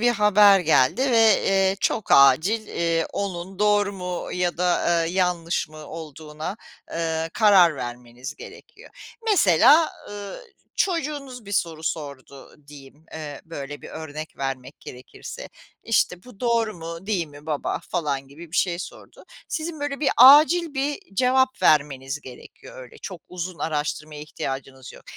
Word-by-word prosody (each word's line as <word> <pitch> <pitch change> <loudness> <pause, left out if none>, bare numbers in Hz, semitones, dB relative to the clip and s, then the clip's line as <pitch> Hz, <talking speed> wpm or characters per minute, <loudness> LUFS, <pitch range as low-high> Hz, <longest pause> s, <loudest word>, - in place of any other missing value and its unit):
bir 240 +1 +4
haber 210 -2 +5
geldi 160 - +2
ve, 225 -3 +5
eee, 195 0 +2
çok 220 - -1
acil, 165 - +5
eee, 165 -1 -1
onun 190 -1 -5
doğru 205 -1 +2
mu 180 -2 -5
ya 180 -1 -1
da, 180 - 0
aaa, 175 -1 +2
yanlış 175 -2 -1
mı 155 -1 -12
olduğuna, 155 +3 -7 0.3
eee, 165 -1 -2
karar 190 -7 +5
vermeniz 125 +3 -7
gerekiyor. - - -13 0.4
Mesela, 295 - +5 0.2
ııı, 205 - -8 0.4
çocuğunuz 285 - -2
bir 200 - -9
soru 165 -4 -1
sordu 140 -4 -7
diyeyim, 145 +1 -15
eee, 150 -3 -7
böyle 145 -3 -8
bir - - -9
örnek 155 0 -8
vermek 135 0 -5
gerekirse, 130 - -10 0.3
işte, 180 -5 0
“Bu 250 -6 -16
doğru 230 -3 +1
mu, 165 +2 -8
değil 190 -6 -1
mi 145 +1 -15
baba?“ 150 -3 -2
falan 140 -6 -2
gibi 160 +4 -13
bir - - -2
şey 175 -2 +1
sordu. - - -10 0.2
Sizin 315 -2 -4
böyle 290 -1 -3
bir 295 - +2
acil 300 +5 +7
bir 280 +2 -1 0.2
cevap 260 +3 +2
vermeniz 140 -1 +2
gerekiyor. - - -12
Öyle 470 -2 -14
çok 185 -5 -7
uzun 180 -1 -6
araştırmaya 150 0 -3
ihtiyacınız 135 -3 -7
yok. - - -15
175 Hz, 145 wpm, -23 LUFS, 150-215 Hz, 0.4 s, acil